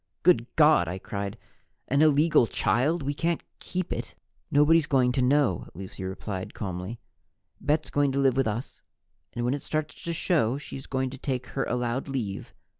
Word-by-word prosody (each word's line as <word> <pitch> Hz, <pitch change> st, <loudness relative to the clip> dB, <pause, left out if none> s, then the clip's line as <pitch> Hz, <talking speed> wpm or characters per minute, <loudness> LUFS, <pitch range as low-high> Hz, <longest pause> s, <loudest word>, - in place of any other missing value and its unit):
"Good 140 Hz, -10 st, +4 dB
God!" 150 Hz, -, +5 dB
I 90 Hz, +3 st, -3 dB
cried. 100 Hz, +1 st, -5 dB, 0.5 s
"An 140 Hz, +3 st, +2 dB
illegal 150 Hz, -4 st, +5 dB
child! 130 Hz, -, +1 dB
We 140 Hz, +1 st, -1 dB
can't 165 Hz, +3 st, -1 dB, 0.2 s
keep 185 Hz, -1 st, -3 dB
it!" -, -, -6 dB, 0.3 s
"Nobody's 150 Hz, +2 st, +4 dB
going 130 Hz, -3 st, +3 dB
to 130 Hz, +1 st, 0 dB
know," 125 Hz, -, +2 dB
Lucy 95 Hz, +1 st, -8 dB
replied 95 Hz, 0 st, -5 dB
calmly. 95 Hz, +3 st, -5 dB, 0.6 s
"Bet's 150 Hz, +1 st, 0 dB
going 145 Hz, -1 st, +2 dB
to 140 Hz, -, 0 dB
live 135 Hz, -2 st, +3 dB
with 135 Hz, -2 st, +2 dB
us, 110 Hz, +4 st, -4 dB, 0.5 s
and 120 Hz, 0 st, -2 dB
when 125 Hz, -, +1 dB
it 145 Hz, -, -3 dB
starts 155 Hz, 0 st, -2 dB
to 170 Hz, -, -1 dB
show, 150 Hz, -, +1 dB
she's 135 Hz, -2 st, -8 dB
going 130 Hz, -1 st, -1 dB
to 135 Hz, -, -9 dB
take 130 Hz, -3 st, -2 dB
her 135 Hz, -, -2 dB
allowed 125 Hz, +2 st, -1 dB
leave. 110 Hz, -8 st, -4 dB
135 Hz, 175 wpm, -27 LUFS, 115-150 Hz, 0.6 s, God